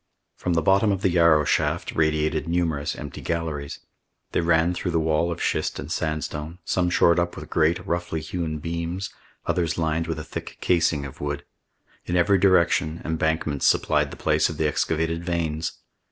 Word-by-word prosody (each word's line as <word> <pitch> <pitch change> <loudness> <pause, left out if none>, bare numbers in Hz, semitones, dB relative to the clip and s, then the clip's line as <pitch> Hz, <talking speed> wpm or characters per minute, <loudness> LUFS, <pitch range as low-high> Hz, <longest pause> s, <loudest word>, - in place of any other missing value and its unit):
From 90 - -2
the 80 -2 +1
bottom 100 +4 +4
of 95 0 -2
the 95 - +3
Yarrow 85 -3 +5
shaft - - 0
radiated 80 -1 +1
numerous 80 -4 0
empty 70 -3 -7
galleries. 80 -4 -3 0.5
They - - +1
ran 85 +1 +3
through 90 +1 -3
the 85 -1 +1
wall 80 +2 +1
of 85 - -4
schist - - 0
and 70 +4 -6
sandstone, 80 0 -3
some 90 -1 +1
shored 85 0 +4
up 85 0 -1
with - - -9
great, 80 +2 +2
roughly 85 -1 -2
hewn 80 0 -3
beams, 85 +4 -4 0.3
others 85 -3 0
lined 80 0 0
with 80 - -2
a 75 - -5
thick - - -7
casing 80 -5 +2
of 70 +2 -10
wood. 75 0 -3 0.6
In 90 - -1
every 90 +3 +4
direction 85 -3 +3
embankments 80 -2 0
supplied - - +2
the - - -10
place - - +2
of - - -6
the 80 - +2
excavated 80 +3 0
veins. 80 -2 -2
80 Hz, 175 wpm, -24 LUFS, 80-85 Hz, 0.6 s, Yarrow